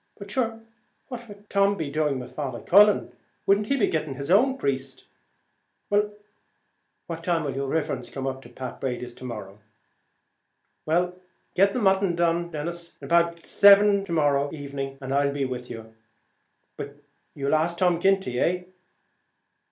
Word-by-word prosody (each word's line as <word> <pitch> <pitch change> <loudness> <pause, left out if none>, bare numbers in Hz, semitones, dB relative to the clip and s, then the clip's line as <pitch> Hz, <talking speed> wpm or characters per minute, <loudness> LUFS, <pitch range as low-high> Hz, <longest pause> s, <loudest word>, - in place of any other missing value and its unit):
but 200 0 -9
shure 225 -1 -1 0.5
what 240 -2 -7
would 205 0 -14
Tom 200 0 +2
be 155 -5 -3
doing 150 -2 0
with 125 - -8
Father 130 -5 -4
Cullen? 205 +2 +5 0.3
wouldn't 200 +1 +3
he 275 - +1
be 225 - +3
going 160 -2 -1
to 140 - -5
his 140 +4 -4
own 260 +7 +4
priest? 135 - -3 0.9
Well, 210 0 +2 0.9
what 165 -1 -6
time 170 -2 +1
will 140 -3 -3
yer 140 0 -2
riverence 140 -4 -2
come 135 -1 -5
up 135 0 -3
to - - -14
Pat 130 -2 -8
Brady's 125 -2 -3
to - - -14
morrow?" 105 -5 -7 1.3
"Well, 180 +3 +1 0.4
get 195 +2 +4
the - - -1
mutton 190 -3 +2
done 170 0 +1 0.5
about 170 0 +1
seven 200 0 +6
to 185 - -8
morrow 145 -3 +2
evening, 140 -2 -6
and 135 0 -4
I'll 140 0 +2
be 140 -1 -1
with 125 -1 -5
you. 110 -1 -9 0.8
But - - -7 0.4
you'll 140 0 -1
ask 165 +2 +1
Tom 180 -2 +2
Ginty, 190 -10 +1
eh?" 180 +1 +1
165 Hz, 160 wpm, -25 LUFS, 135-195 Hz, 1.3 s, seven